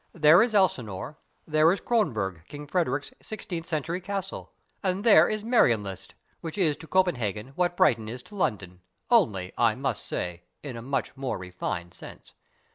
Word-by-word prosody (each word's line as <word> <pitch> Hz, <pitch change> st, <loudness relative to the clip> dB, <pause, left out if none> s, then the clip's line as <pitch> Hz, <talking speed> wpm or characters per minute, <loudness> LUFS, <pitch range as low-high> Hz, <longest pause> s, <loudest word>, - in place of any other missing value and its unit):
There 160 Hz, +2 st, +7 dB
is 230 Hz, -2 st, +1 dB
Elsinore, 125 Hz, -, 0 dB, 0.3 s
there 155 Hz, +1 st, +4 dB
is 195 Hz, -, 0 dB
Kronborg, 110 Hz, -, 0 dB
King 145 Hz, 0 st, -8 dB
Frederick's 145 Hz, -3 st, -1 dB
sixteenth 175 Hz, -6 st, -6 dB
century 165 Hz, +2 st, -2 dB
castle, 195 Hz, +1 st, -5 dB, 0.3 s
and 190 Hz, +1 st, -1 dB
there 230 Hz, -3 st, +7 dB
is 215 Hz, -1 st, -2 dB
Marienlyst, 115 Hz, -, +1 dB, 0.2 s
which 165 Hz, +3 st, -7 dB
is 160 Hz, -7 st, +2 dB
to 165 Hz, -, -11 dB
Copenhagen 125 Hz, -, 0 dB
what 175 Hz, +5 st, -1 dB
Brighton 115 Hz, -, +3 dB
is 125 Hz, +2 st, -7 dB
to 210 Hz, -, -14 dB
London, 95 Hz, -, -2 dB, 0.3 s
only, 105 Hz, -, +3 dB
I -, -, +4 dB
must -, -, -2 dB
say, 90 Hz, -1 st, -4 dB, 0.2 s
in 135 Hz, -4 st, -6 dB
a 115 Hz, -, -6 dB
much 135 Hz, 0 st, -2 dB
more 135 Hz, -1 st, -3 dB
refined 90 Hz, -2 st, -5 dB
sense. -, -, -12 dB
150 Hz, 160 wpm, -27 LUFS, -, 0.3 s, There